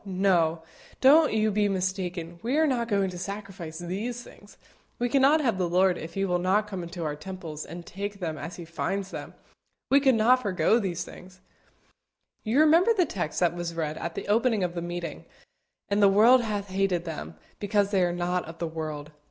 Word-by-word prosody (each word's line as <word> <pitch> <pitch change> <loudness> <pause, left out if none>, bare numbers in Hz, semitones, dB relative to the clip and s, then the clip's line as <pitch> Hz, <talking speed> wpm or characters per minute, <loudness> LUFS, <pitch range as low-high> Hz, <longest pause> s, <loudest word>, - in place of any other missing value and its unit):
no; 180 -4 +1 0.4
don't 300 +4 +6
you 215 0 +1
be 205 0 +1
mistaken: 180 -3 -3
we 250 +6 0
are 315 - +4
not 245 -5 0
going 200 -3 +1
to 180 -1 -6
sacrifice 195 -4 -7
these 205 +8 -4
things. 205 - -16 0.4
We 245 0 -1
cannot 275 +4 +4
have 230 -9 0
the 180 -2 0
Lord 185 +1 +3
if 165 +3 -8
He 195 0 0
will 180 -2 0
not 190 +4 +2
come 195 -3 -6
into 170 0 -6
our 150 -2 -2
temples 165 -2 -7
and 170 +2 -9
take 200 +1 -6
them 165 -4 -3
as 165 +3 -7
He 170 - -9
finds 195 +4 -3
them. - - -8 0.6
We 275 - +7
could 265 -3 +4
not 245 +4 +4
forego 200 +1 +2
these 180 -5 -2
things." 185 0 -13 1.0
You 240 +7 +3
remember 335 +9 +5
the 360 - +4
text 175 - -3
that 175 -1 +2
was 175 -1 -4
read 155 -2 -2
at 170 0 -5
the - - -5
opening 220 -1 +2
of 175 -1 -1
the 170 - -4
meeting 175 -2 -5 0.6
"And 200 +1 +1
the 200 - +7
world 230 +6 +6
hath 205 -3 -3
hated 190 -2 0
them, 80 - -6 0.2
because 205 -1 +1
they 195 -3 +2
are 175 -1 +2
not 175 +1 -1
of 165 +1 -10
the 170 - -3
world." 155 -2 -6
190 Hz, 200 wpm, -27 LUFS, 175-215 Hz, 1.0 s, We